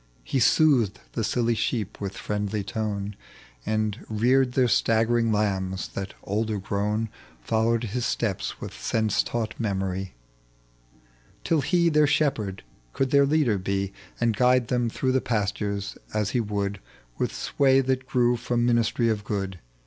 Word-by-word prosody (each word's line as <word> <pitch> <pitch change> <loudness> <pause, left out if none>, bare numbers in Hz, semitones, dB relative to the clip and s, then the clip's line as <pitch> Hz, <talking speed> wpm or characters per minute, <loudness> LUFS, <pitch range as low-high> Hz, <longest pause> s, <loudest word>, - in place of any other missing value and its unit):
He 135 - -1
soothed 125 - +4
the 115 - -2
silly 120 +1 +1
sheep 110 -2 -2
with 100 -1 -4
friendly 105 0 -2
tone, 100 0 -3 0.5
And 110 0 -1
reared 125 +4 +3
their 130 -1 +3
staggering 115 +1 +2
lambs, 95 -3 0
that, 95 0 -6
older 110 +1 -1
grown, 105 +3 -1 0.3
Followed 115 - +1
his 120 +2 -2
steps 110 -5 -2
with - - -7
sense 110 -2 +1
taught 115 -2 -3
memory; 95 - -2 1.3
Till 160 -3 +2
he, 170 +4 +2
their 150 -2 +4
shepherd, 135 -11 0 0.3
could 135 -1 0
their 140 -1 +5
leader 140 -9 +2
be, 100 +1 -2 0.3
And 115 -2 +2
guide 125 +1 +3
them 120 -2 +1
through 130 +3 -1
the 130 0 +2
pastures 100 -2 -2 0.2
as 105 -2 0
he 125 - +1
would. 100 -2 -2 0.4
With - - 0
sway 135 -1 +2
that 130 0 -1
grew 120 -1 +2
from 120 0 0
ministry 120 0 +2
of 110 -2 0
good. 95 -3 -3
110 Hz, 145 wpm, -26 LUFS, 100-125 Hz, 1.3 s, their